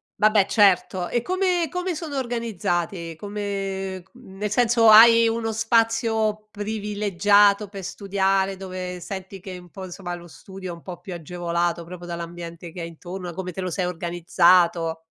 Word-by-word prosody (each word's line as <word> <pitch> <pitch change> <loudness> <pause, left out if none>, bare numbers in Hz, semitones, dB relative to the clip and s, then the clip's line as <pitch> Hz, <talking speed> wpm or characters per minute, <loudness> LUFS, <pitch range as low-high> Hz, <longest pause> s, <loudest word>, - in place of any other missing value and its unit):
vabbè, 215 -2 +4
certo. 185 -3 +3
E 240 -1 0
come 365 -2 0
come 360 -1 -2
sono 305 -3 -5
organizzati? 195 -8 -2
Come 195 -1 -4
c - - -32
nel 200 +2 -6
senso, 230 -1 +4
hai 230 +1 +8
uno 225 0 -1
spazio 225 -1 +1
privilegiato 205 -1 +2
per 195 -2 -8
studiare, 195 0 0
dove 185 -1 -6
senti 190 +1 -7
che 185 -1 -8
un 180 -1 -14
po', 190 -1 -8
insomma, 175 -1 -6
lo 175 0 -9
studio 190 +2 -10
è - - -6
un 170 - -16
po' 175 -2 -8
più 180 0 -7
agevolato, 170 +1 -2
proprio 175 +1 -10
dall'ambiente 170 0 -7
che 175 +1 -7
hai 165 - -5
intorno, 180 +2 -8
da - - -7
come 185 -1 -4
te 190 - -6
lo 185 -1 -3
sei 185 +1 -1
organizzato. 170 -1 +2
190 Hz, 165 wpm, -24 LUFS, 175-215 Hz, -, hai